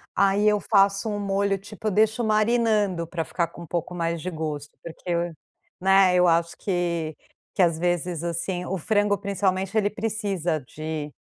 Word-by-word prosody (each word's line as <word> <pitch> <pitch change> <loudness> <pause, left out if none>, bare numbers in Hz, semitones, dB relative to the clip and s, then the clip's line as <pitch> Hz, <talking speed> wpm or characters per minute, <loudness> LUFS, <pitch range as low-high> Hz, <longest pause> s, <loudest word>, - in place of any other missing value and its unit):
aí 200 +1 +3
eu 210 -1 +4
faço 195 0 +3
um 205 -1 -2
molho, 200 0 0
tipo, 205 +2 -7
eu - - +2
deixo 220 +4 +2
marinando 215 -5 +2
pra 165 0 -3
ficar 170 +1 -1
com 170 - -13
um 170 - -9
pouco 175 +2 -3
mais 170 -1 -1
de 180 - -4
gosto, 150 -2 -5
porque, 170 +1 -5 0.7
né, 190 0 +5
eu 180 0 +5
acho 170 0 +2
que 170 -4 -2 0.4
que - - +2
às 170 -3 +3
vezes 175 -1 -1
assim, 175 +2 -2
o 190 +1 -3
frango, 205 +3 +2
principalmente, 195 0 -1
ele 205 -1 +3
precisa 200 -7 -2
de 155 +3 -6
185 Hz, 170 wpm, -25 LUFS, 170-205 Hz, 0.7 s, né